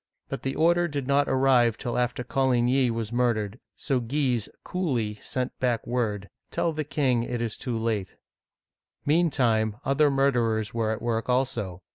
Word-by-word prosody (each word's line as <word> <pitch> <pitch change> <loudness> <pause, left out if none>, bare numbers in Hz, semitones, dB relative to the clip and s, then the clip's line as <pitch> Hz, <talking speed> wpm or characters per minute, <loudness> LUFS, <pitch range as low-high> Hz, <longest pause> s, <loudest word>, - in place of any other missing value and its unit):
But - - -4
the 135 - -2
order 175 +2 +3
did 145 -4 -3
not 140 +1 +2
arrive 130 -4 +3
till 120 - -3
after 125 0 0
Coligny 130 0 +2
was 115 -1 -3
murdered, 115 -3 0 0.2
so 135 -4 -1
Guise 125 -2 0
coolly 120 - -2
sent 130 -1 -3
back 120 -3 0
word, 110 -5 -1
" - - -56
Tell 165 - 0
the 155 0 -2
king 140 -4 +1
it 120 0 -3
is 115 -2 -2
too 120 -3 -3
late! 110 -4 -2 0.5
" - - -53
Meantime, 125 -9 +2
other 145 +2 +3
murderers 120 -6 +1
were 115 -2 0
at 110 +1 -3
work 115 0 -1
also. 115 -8 -1
125 Hz, 165 wpm, -26 LUFS, 115-135 Hz, 0.5 s, order